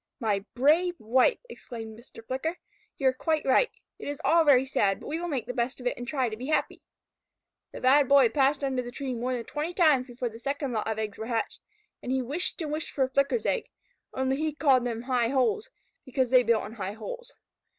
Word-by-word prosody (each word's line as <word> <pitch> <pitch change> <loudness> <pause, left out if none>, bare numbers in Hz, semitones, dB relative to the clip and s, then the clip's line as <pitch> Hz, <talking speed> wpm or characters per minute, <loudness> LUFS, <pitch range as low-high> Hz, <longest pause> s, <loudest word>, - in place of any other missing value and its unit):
"My 210 -5 0
brave 320 +8 +3
wife!" 250 - +3
exclaimed 225 - -8
Mr. 230 -1 -14
Flicker. 290 +8 -3 0.4
"You 270 -2 +3
are - - -1
quite 310 +3 -1
right. 275 - +4 0.3
It - - -7
is 290 -1 -4
all 330 0 +5
very 270 -4 +5
sad, 200 -7 +1
but - - -12
we 315 +2 -3
will 350 - -3
make 265 -9 -2
the 250 - -5
best 245 +2 -2
of 250 - -10
it 245 - 0
and 245 - -7
try 265 -3 0
to 215 - -4
be 250 +4 -7
happy." 310 - 0 0.9
The - - -9
Bad 270 +1 +5
Boy 275 -4 +6
passed 275 +3 +2
under 265 -2 0
the 240 - -7
tree 260 +1 -4
more 250 +2 -2
than 235 -2 -5
twenty 315 +4 -4
times 295 -8 +4
before 245 0 -4
the 225 0 -11
second 280 +1 -2
lot 220 -1 -2
of 220 -1 -2
eggs 215 -2 -4
were 220 - -4
hatched, 230 -2 -2 0.4
and 250 - -4
he 265 - +2
wished 295 +9 -2
and 300 - -4
wished 310 +2 -3
for 275 - 0
a 260 - 0
Flicker's 275 - +1
egg - - 0 0.4
(only 265 0 0
he 310 0 -2
called 270 -5 +3
them 230 -1 -4
High 250 -2 +1
Holes, 420 - +1 0.3
because 260 -2 -1
they 255 -1 +7
built 230 -2 +1
in 210 - -8
high 200 -3 -5
holes). - - -8
260 Hz, 230 wpm, -28 LUFS, 235-295 Hz, 0.9 s, they